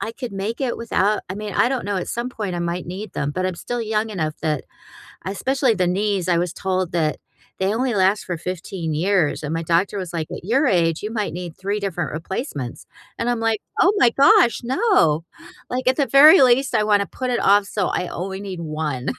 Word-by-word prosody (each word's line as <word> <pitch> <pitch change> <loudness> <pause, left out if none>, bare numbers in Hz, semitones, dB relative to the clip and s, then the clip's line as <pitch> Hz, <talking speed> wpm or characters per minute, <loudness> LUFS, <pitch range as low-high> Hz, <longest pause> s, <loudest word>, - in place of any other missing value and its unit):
I 225 - -4
could 245 -2 -7
make 205 +6 -4
it 255 -3 -1
without 215 -2 0
I 185 - -4
mean, 210 0 -6
I - - +3
don't 260 -2 -2
know, 205 -1 -2
at 180 - -3
some 240 +1 -3
point, 210 -7 -4
I 175 - -3
might 170 +1 -3
need 190 +3 -7
them, 140 +1 -2
but 185 +4 -2
I'm 185 -2 -3
still 245 +4 -4
young 220 0 -1
enough 155 -6 -2
that 155 -4 -1 0.6
Especially 255 +5 0
the 185 -2 +1
knees, 195 -1 0
I 170 -1 +3
was 175 -1 -1
told 185 -2 -2
that 160 -3 0 0.4
they 195 +3 +1
only 250 +1 0
last 195 +1 +2
for 175 -3 -4
15 175 -2 -4
years, 170 -2 +1
and 150 - -4
my 165 - -2
doctor 175 +5 +1
was 180 -3 -5
like, 160 -2 -3
"At - - -7
your 260 +9 +2
age, 165 -5 +1
you 210 - -4
might 215 -3 -2
need 175 -2 -6
3 200 +2 -2
different 180 -6 -3
replacements." 155 - -5 0.3
and 230 - -1
I'm 240 -1 -1
like, 225 -2 0 0.2
"Oh 380 - +5
my 240 -7 +5
gosh, 245 -3 +5
no!" 250 - +2 0.5
Like, 255 +1 -1
at 260 - +2
the 280 - +1
very 300 +6 +8
least, 260 +2 +4
I 210 - +3
wanna 205 -1 +2
put 255 -1 -4
it 240 - 0
off, 200 +1 +4
so 195 -2 -1
I 180 - -1
only 190 +2 -5
need 190 -3 -6
1. 155 -5 -3
195 Hz, 225 wpm, -21 LUFS, 175-230 Hz, 0.6 s, very